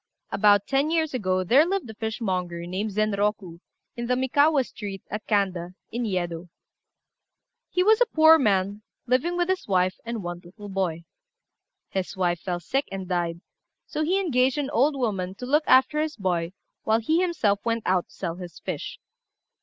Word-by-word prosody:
About 205 -1 +4
ten 275 +2 +1
years 320 -2 0
ago 185 -6 0
there 255 - +5
lived 380 -2 -1
a 220 - -8
fishmonger, 185 -6 -3
named 190 +5 -3
Zenroku, 205 -3 -1 0.4
in 235 0 -4
the 250 - +2
Mikawa 280 +3 +3
street, 200 -5 -7
at 210 +2 -5
Kanda, 185 -4 0 0.2
in 235 +1 -2
Yedo. 175 -3 -3 1.2
He 360 - +1
was 435 +4 +4
a - - +5
poor 320 -3 +6
man, 200 -3 +1 0.2
living 265 +8 +1
with 350 -1 +1
his 375 0 -1
wife 185 -2 +1
and 230 -3 -4
one 175 0 -5
little 205 +4 -11
boy. 180 -4 -2 0.9
His 190 0 -3
wife 175 -2 +1
fell 175 0 -3
sick 270 - -1
and 190 -1 -5
died, 170 -2 -2 0.4
so 310 - -4
he 365 +5 +2
engaged 260 -8 +2
an 285 -1 -2
old 285 +3 +3
woman 195 -8 -2
to 250 - -7
look 300 +4 +2
after 260 +4 +5
his 310 0 -2
boy 175 -3 -1 0.3
while 220 +1 +2
he 315 +10 +1
himself 230 - +1
went 230 -1 -1
out 185 -1 +1
to - - -20
sell 170 -3 -4
his 180 -2 -9
fish. - - -5
210 Hz, 175 wpm, -25 LUFS, 185-275 Hz, 1.2 s, poor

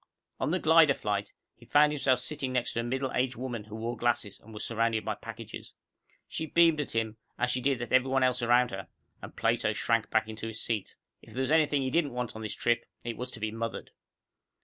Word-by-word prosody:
On - - 0
the - - +2
glider - - +6
flight, - - -2 0.2
he - - -18
found 150 +1 +5
himself 135 -3 +2
sitting 135 0 -2
next 125 -1 0
to - - -1
a - - 0
middle 130 +2 -2
aged 125 0 0
woman 120 -3 -5
who 110 0 -9
wore 115 +2 -3
glasses 115 -3 0
and 110 - -15
was 105 0 -5
surrounded 115 -1 0
by - - 0
packages. - - -9 0.5
She 160 - -4
beamed 165 -2 +4
at 145 - -5
him, 110 -1 -1 0.2
as 125 - +1
she 125 - 0
did 135 -1 +1
at 120 - -6
every 130 +1 +4
one 135 0 +2
else 125 -1 +2
around 120 +1 +4
her, 95 0 -6 0.3
and - - -9
Plato - - +1
shrank - - +1
back 110 0 +2
into 110 0 -6
his 110 0 -5
seat. 110 -5 -2 0.3
If - - -15
there 130 - -1
was 130 - 0
anything 150 -3 +3
he 130 - -1
didn't 150 -4 +1
want 125 -2 -3
on 110 - -6
this 110 - -4
trip, 120 0 +1 0.2
it 115 -1 -3
was 125 +1 -5
to 120 - -8
be 110 0 -2
mothered. 115 +1 -5
120 Hz, 235 wpm, -29 LUFS, 115-130 Hz, 0.5 s, glider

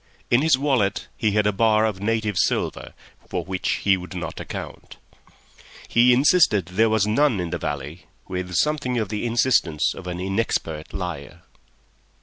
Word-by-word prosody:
In 120 - +5
his 155 -4 +4
wallet 130 -8 0
he 110 -3 0
had 105 0 +2
a 105 - +3
bar 110 +1 +3
of 105 -4 -2
native 110 -1 -1
silver - - -1 0.3
for - - -3
which 95 -1 -2
he 100 -1 +4
would 90 +1 -9
not 85 -4 -5
account; - - -8 0.9
he 120 +1 +4
insisted 125 - +4
there 100 +6 +1
was 110 -2 +2
none 115 +1 +2
in 85 -2 -3
the 85 - -3
valley 75 +3 -5 0.2
with 90 -1 -4
something 135 - 0
of 110 -4 -1
the 105 +3 -2
insistence 115 - +2
of 90 - -10
an 90 -1 -4
inexpert 95 -5 -2
liar. 90 -7 -6
105 Hz, 160 wpm, -23 LUFS, 90-115 Hz, 0.9 s, In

